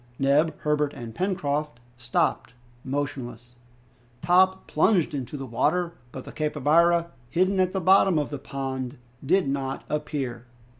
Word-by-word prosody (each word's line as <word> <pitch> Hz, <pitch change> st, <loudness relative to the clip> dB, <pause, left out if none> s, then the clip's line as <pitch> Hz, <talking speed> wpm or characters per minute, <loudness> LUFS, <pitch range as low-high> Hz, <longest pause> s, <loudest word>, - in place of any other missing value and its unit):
Neb, 145 Hz, +3 st, +2 dB
Herbert, 150 Hz, -1 st, 0 dB
and 115 Hz, -2 st, -8 dB
Pencroft 150 Hz, -, -2 dB, 0.2 s
stopped, 120 Hz, 0 st, -1 dB, 0.3 s
motionless. 130 Hz, -3 st, -4 dB, 0.7 s
Top 185 Hz, +1 st, +3 dB
plunged 175 Hz, 0 st, +2 dB
into 140 Hz, 0 st, -4 dB
the 135 Hz, -, -6 dB
water, 170 Hz, +8 st, 0 dB, 0.2 s
but 130 Hz, -, -8 dB
the -, -, -9 dB
capybara, 165 Hz, +3 st, +2 dB, 0.2 s
hidden 185 Hz, +6 st, +1 dB
at 185 Hz, -1 st, +2 dB
the 190 Hz, -, -1 dB
bottom 190 Hz, -1 st, +5 dB
of 150 Hz, -1 st, -1 dB
the 145 Hz, -, -4 dB
pond, 130 Hz, -1 st, -5 dB, 0.3 s
did 180 Hz, +4 st, +2 dB
not 135 Hz, -1 st, -3 dB
appear. 140 Hz, -5 st, -3 dB
150 Hz, 135 wpm, -25 LUFS, 135-170 Hz, 0.7 s, bottom